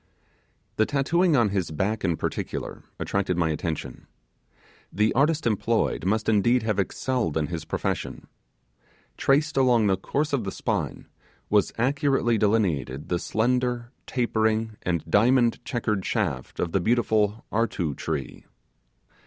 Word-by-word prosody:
The 110 - +3
tattooing 160 +4 +2
on 120 -5 +4
his 95 -4 -1
back 100 +8 -1
in 85 -4 +1
particular - - -4 0.2
attracted 100 -3 -1
my 85 -2 +2
attention. 75 -5 -4 0.8
The 105 +3 +2
artist 150 +3 +2
employed 115 -4 0
must 110 +2 0
indeed 115 +3 +3
have 110 -2 0
excelled 115 - -1
in 80 - +1
his 85 0 -5
profession. - - -3 0.9
Traced 150 +2 +2
along 125 -4 +4
the 95 -2 +2
course 145 +10 -2
of 130 -5 +1
the 95 - -3
spine - - -3 0.5
was 105 -1 +3
accurately 135 -2 +1
delineated 90 -11 0
the 90 - 0
slender, 120 +2 0 0.2
tapering 110 -2 0
and 85 -3 -1
diamond 120 +2 +3
checkered 110 -5 -1
shaft 65 -6 -2
of 85 - -1
the 95 - +2
beautiful 110 -1 +1
'artu' 95 -9 -1
tree. 75 -4 -4
110 Hz, 130 wpm, -25 LUFS, 95-125 Hz, 0.9 s, on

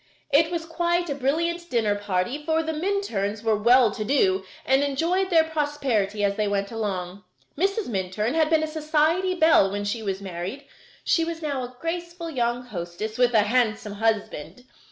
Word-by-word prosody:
It 320 +3 +5
was 340 -2 -3
quite 345 0 0
a - - +1
brilliant 335 +6 -1
dinner 225 -6 +1
party, 205 +7 -2
for 320 +1 +1
the 320 0 -3
Minturns 305 - -2
were 220 -1 +2
well 235 +2 +5
to 215 - -4
do 195 -6 +2 0.2
and 265 +1 +3
enjoyed 335 +7 0
their 330 -3 +5
prosperity 280 -10 -1
as 200 0 +1
they 210 -1 +1
went 200 0 -1
along. 195 -4 -4 0.3
Mrs. 395 +6 0
Minturn 205 +2 -2
had 315 -1 +2
been 320 -1 +3
a - - -1
society 315 +4 +1
belle 315 - +5
when 205 +1 -3
she 205 +3 -2
was 195 -3 -3
married. 190 +8 -6 0.4
She 330 - +2
was 330 0 -5
now 285 -3 -2
a 250 0 -9
graceful 340 +1 -4
young 240 -2 -1
hostess, 210 +1 -6
with 245 -1 +3
a 210 - +6
handsome 215 -2 0
husband. 220 -1 -2
255 Hz, 175 wpm, -25 LUFS, 205-320 Hz, 0.4 s, a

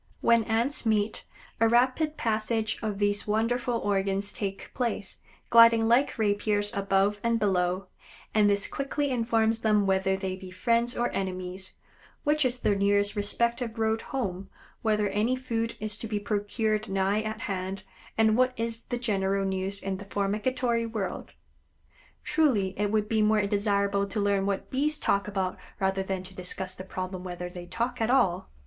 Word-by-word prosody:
When 230 -1 +4
Ants 235 +6 0
meet, 215 -2 0 0.3
a 225 0 +4
rapid 255 +6 +2
passage 220 0 0
of 215 -3 -2
these 205 0 0
wonderful 235 +3 0
organs 200 -2 0
takes 195 -2 -4
place, 230 -6 -3 0.3
gliding 230 -1 +7
like 245 +5 +3
rapiers 205 -1 +1
above 200 0 +1
and 230 0 +2
below, 185 -2 +1 0.5
and 210 -1 +4
this 200 0 +2
quickly 280 0 -2
informs 225 -2 +1
them 210 -2 +3
whether 190 0 +2
they 190 -1 -3
be 185 0 -10
friends 235 +6 +1
or 240 0 0
enemies, 185 0 -4 0.5
which 300 -1 +2
is 250 0 -1
the 205 - +3
nearest 200 +1 +2
respective 235 +3 -1
road 220 0 +1
home, 195 -8 -3 0.3
whether 210 -2 +2
any 220 +6 +1
food 230 -3 -3
is 215 -1 -1
to 225 - -4
be 210 -1 -1
procured 215 +1 -1
nigh 195 +2 +1
at 220 +1 -5
hand, 195 -4 -4 0.3
and 220 -1 +4
what 255 +1 +3
is 230 0 -2
the 245 - -3
general 195 -4 0
news 190 +1 -2
in 195 -1 -2
the 200 - -9
formicatory 230 +4 -1
world. 210 -4 -4 0.9
Truly 255 -12 +2
it 205 0 0
would 215 0 +1
be 220 0 +1
more 210 -1 +3
desirable 200 -1 +1
to 210 - -3
learn 200 -1 +1
what 200 -1 -2
Bees 300 +3 +1
talk 200 -8 +1
about 190 -3 -2 0.2
rather 190 -1 +1
than 190 -1 -3
to 190 +1 -11
discuss 185 0 -3
the 185 - -8
problem 185 -1 -5
whether 180 -1 -5
they 175 -1 -8
talk 240 +5 -2
at 225 - +1
all. 190 -9 +2
210 Hz, 165 wpm, -28 LUFS, 195-230 Hz, 0.9 s, gliding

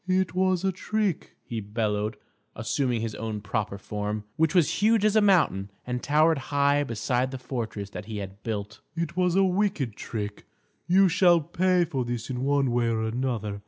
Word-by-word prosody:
"It 185 0 +1
was 185 -1 +1
a 190 - +2
trick!" 205 -1 -2
he 115 - -4
bellowed, 105 0 -2 0.4
assuming 115 +2 -1
his 115 -1 -3
own 110 -1 -4
proper 100 -1 -3
form, 105 +1 -4
which 160 +1 +1
was 175 +1 +3
huge 220 0 +4
as 215 0 +3
a 215 - +6
mountain, 160 - +3 0.2
and 125 0 -3
towered 155 +1 +3
high 145 0 +3
beside 125 +1 -1
the 130 - -5
fortress 115 -6 -5
that 105 - -7
he 110 -1 -6
had 100 0 -7
built. 105 -2 -4 0.2
"It 170 0 -3
was 180 -1 +2
a 195 - +5
wicked 185 - 0
trick. 105 -2 -6 0.4
You 190 +2 +5
shall 175 -1 +5
pay 175 +3 +2
for 135 -6 -2
this 120 +1 -4
in 125 0 -3
one 140 -2 +2
way 120 0 +1
or 115 -1 0
another. 110 -3 -2
130 Hz, 185 wpm, -26 LUFS, 110-175 Hz, 0.4 s, a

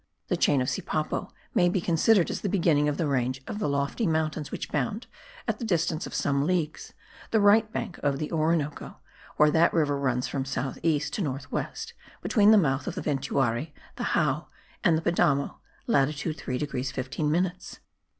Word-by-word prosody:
The - - +2
chain 140 -3 +3
of - - -4
Sipapo 155 +3 -2 0.2
may 175 -1 +4
be 185 - +1
considered 175 +3 +3
as - - -4
the 200 - -1
beginning 165 -6 +3
of 145 - -2
the 165 - 0
range 130 -2 0
of 210 - -5
lofty 140 - 0
mountains 155 -2 -1
which - - -5
bound, 155 - -1 0.4
at - - -1
the - - -5
distance 170 -6 0
of - - -8
some 140 +1 +1
leagues, 170 -4 -2 0.4
the 220 - +3
right 215 +2 +5
bank 175 - -4
of 140 -1 0
the 150 +1 -4
Orinoco, 155 -2 -1 0.4
where 150 0 +5
that 165 +2 +4
river 145 -3 +2
runs 125 -2 0
from 135 - -2
south 130 0 -3
east 155 -2 0
to - - -2
north 135 -4 -4
west, 455 +1 -4 0.3
between 210 -3 +4
the 220 - +8
mouth 135 -7 +1
of - - -3
the - - -4
Ventuari, 135 0 -1 0.2
the - - -2
Jao - - +1 0.4
and 165 -2 +4
the 165 - -4
Padamo 145 -5 +1 0.3
(latitude 150 +3 +1
3 125 -4 -4
degrees 135 -2 -3
15 135 +3 -2
minutes). 180 +3 -2
155 Hz, 185 wpm, -27 LUFS, 140-175 Hz, 0.4 s, the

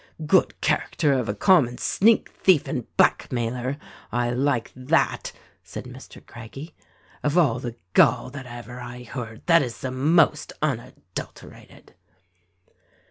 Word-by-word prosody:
"Good - - +3
character 145 -3 +1
of 125 -5 -1
a 105 - -1
common 125 - +4
sneak 220 +3 +3
thief 180 -7 +3
and 125 - -3
black - - +3
mailer! 125 +3 -2 0.3
I 120 0 0
like 125 -2 0
that," 130 0 0 0.3
said - - -8
Mr. - - -12
Craggie. 135 +8 -10 0.5
"Of 150 +3 0
all 135 -9 +3
the 120 -2 -6 0.2
gall - - +4
that 140 -3 -8
ever 120 +1 -9
I 120 0 -8
heard 115 -2 -8
that 170 -1 +5
is 120 -4 -4
the 130 - -3
most 150 +3 +2
unadulterated." 125 -9 -6
125 Hz, 135 wpm, -24 LUFS, 120-145 Hz, 0.5 s, that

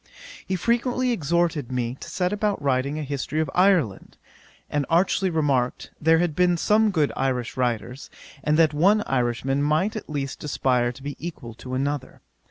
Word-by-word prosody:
'He 190 - 0
frequently 240 +6 +1
exhorted 165 - 0
me 125 -1 -1
to - - -8
set 180 +1 -1
about 210 -1 0
writing 140 +1 0
a 155 - -3
History 140 +2 -3
of 155 -3 -1
Ireland, 180 - +2 0.5
and 145 -1 -1
archly 185 +3 +2
remarked, 140 -7 0
there 160 +1 +5
had 170 -2 0
been 180 0 +3
some 215 +5 +3
good 155 -7 +1
Irish 125 -3 -1
writers, 125 +1 -2 0.3
and 150 0 +2
that 160 -2 +4
one 200 +8 +3
Irishman 130 +2 0
might 155 +9 +1
at 215 - -6
least 140 -3 -4
aspire 125 -4 +1
to 130 +2 -14
be 145 0 -5
equal 140 -9 -6
to 130 +3 -7
another. 140 +2 -3
150 Hz, 170 wpm, -24 LUFS, 130-180 Hz, 0.5 s, there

